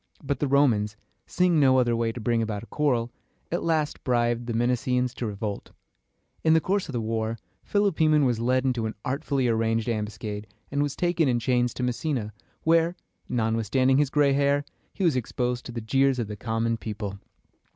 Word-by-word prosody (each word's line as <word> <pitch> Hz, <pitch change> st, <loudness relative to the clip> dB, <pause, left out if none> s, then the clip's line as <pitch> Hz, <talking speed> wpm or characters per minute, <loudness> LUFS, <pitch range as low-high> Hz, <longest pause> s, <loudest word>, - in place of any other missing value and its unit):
But 140 Hz, 0 st, -2 dB
the 145 Hz, -, 0 dB
Romans, 115 Hz, -7 st, +2 dB, 0.3 s
seeing 180 Hz, -3 st, +2 dB
no 130 Hz, -2 st, +5 dB
other 120 Hz, -2 st, +3 dB
way 115 Hz, 0 st, 0 dB
to 120 Hz, -, -7 dB
bring 115 Hz, +1 st, +1 dB
about 110 Hz, -1 st, -3 dB
a -, -, -8 dB
quarrel, 120 Hz, -4 st, 0 dB, 0.4 s
at 175 Hz, -, 0 dB
last 155 Hz, -3 st, 0 dB
bribed 120 Hz, -1 st, +1 dB
the 120 Hz, -, -2 dB
Messenians 125 Hz, +1 st, +1 dB
to 120 Hz, -, -4 dB
revolt. 105 Hz, 0 st, -5 dB, 0.7 s
In 160 Hz, 0 st, +5 dB
the -, -, +6 dB
course 190 Hz, +3 st, -1 dB
of -, -, -5 dB
the 120 Hz, -, -1 dB
war, 110 Hz, 0 st, -2 dB, 0.3 s
Philopoemen 160 Hz, -8 st, +3 dB
was 120 Hz, -3 st, +1 dB
led 130 Hz, +2 st, +1 dB
into 120 Hz, -4 st, 0 dB
an 110 Hz, -, -5 dB
artfully 140 Hz, -1 st, 0 dB
arranged 115 Hz, 0 st, +1 dB
ambuscade, 105 Hz, -1 st, -3 dB, 0.2 s
and 140 Hz, +1 st, 0 dB
was 145 Hz, -1 st, -1 dB
taken 175 Hz, -3 st, +1 dB
in 125 Hz, -2 st, +2 dB
chains 120 Hz, 0 st, +1 dB
to 125 Hz, -, -3 dB
Messenia, 125 Hz, -3 st, -2 dB, 0.3 s
where, 165 Hz, +1 st, +3 dB, 0.3 s
notwithstanding 120 Hz, +3 st, +2 dB
his 145 Hz, -2 st, +2 dB
gray 145 Hz, -1 st, +3 dB
hair, 140 Hz, +1 st, +2 dB, 0.3 s
he 195 Hz, -, -4 dB
was 165 Hz, -6 st, +3 dB
exposed 125 Hz, 0 st, -2 dB
to -, -, -6 dB
the 120 Hz, -1 st, -5 dB
jeers 135 Hz, +4 st, +2 dB
of 120 Hz, -, -1 dB
the 105 Hz, -, -5 dB
common 115 Hz, +2 st, -1 dB
people. 105 Hz, -3 st, -5 dB
125 Hz, 185 wpm, -26 LUFS, 115-140 Hz, 0.7 s, the